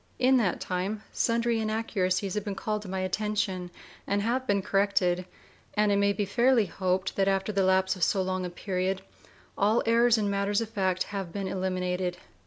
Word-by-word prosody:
In 260 +1 +4
that 205 -8 +1
time 195 +4 -3
sundry 230 0 +1
inaccuracies 205 -4 -1
have 210 - -2
been 205 -2 -4
called 210 +2 -2
to 205 - -9
my 190 0 -2
attention, 190 -1 -1 0.4
and 200 0 0
have 255 +4 -1
been 200 -1 +1
corrected, 185 -2 +1 0.5
and 210 -1 +3
it 200 - +3
may 200 0 +3
be 205 0 -1
fairly 240 +2 +3
hoped 185 +1 -1
that 195 -1 +2
after 195 +1 +1
the 200 -1 +1
lapse 190 0 +3
of 185 - -11
so 195 - +2
long 185 0 -2
a 180 - -3
period 185 +1 -2 0.5
all 215 +4 +2
errors 235 +1 +4
in 210 -2 0
matters 200 0 +1
of 230 -2 -3
fact 190 -4 0
have 195 -4 -4
been 200 0 -3
eliminated. 185 -1 -2
195 Hz, 190 wpm, -28 LUFS, 185-215 Hz, 0.5 s, In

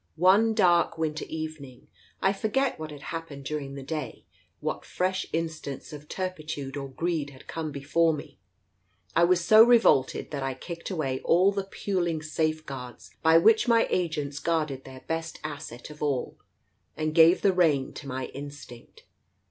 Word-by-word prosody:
"One 200 +6 +4
dark 175 -6 +3
winter 155 -1 -2
evening 155 -5 -7 0.2
— - - -32
I 195 - +4
forget 235 +5 0
what 155 0 -5
had 145 -1 -10
hap 165 0 -5
pened 140 -1 -9
during 140 -1 -4
the 140 - -7
day, 155 +2 -5 0.3
what - - -3
fresh 185 +1 -1
instance 160 -2 -4
of 150 0 -10
turpitude 155 -7 -4
or 135 -1 -5
greed 160 +1 -2
had 135 -1 -15
come 160 -2 -4
before 150 +4 +2
me 150 -2 -7 0.4
— - - -46 0.3
I 170 - +6
was 175 -1 +2
so 215 +4 +9
revolted 230 - +4
that 145 -2 -3
I 135 -1 -2
kicked 170 +5 -7
away 140 -8 -2
all 185 +4 +4
the 200 -1 -3
puling 175 -5 -2
safeguards 155 -5 -3
by 160 0 +6
which 220 +7 +5
my 230 -1 +5
agents 150 -5 -1
guarded 155 -5 -1
their 130 -1 -11
best 165 0 -4
asset 145 -4 -7
of 150 - -13
all, 140 -4 -1 0.6
and 155 0 -1
gave 165 +2 +6
the 195 - +4
rein 155 -7 +2
to 140 - -9
my 130 -1 -3
instinct. 140 -3 -10
155 Hz, 170 wpm, -27 LUFS, 140-175 Hz, 0.6 s, so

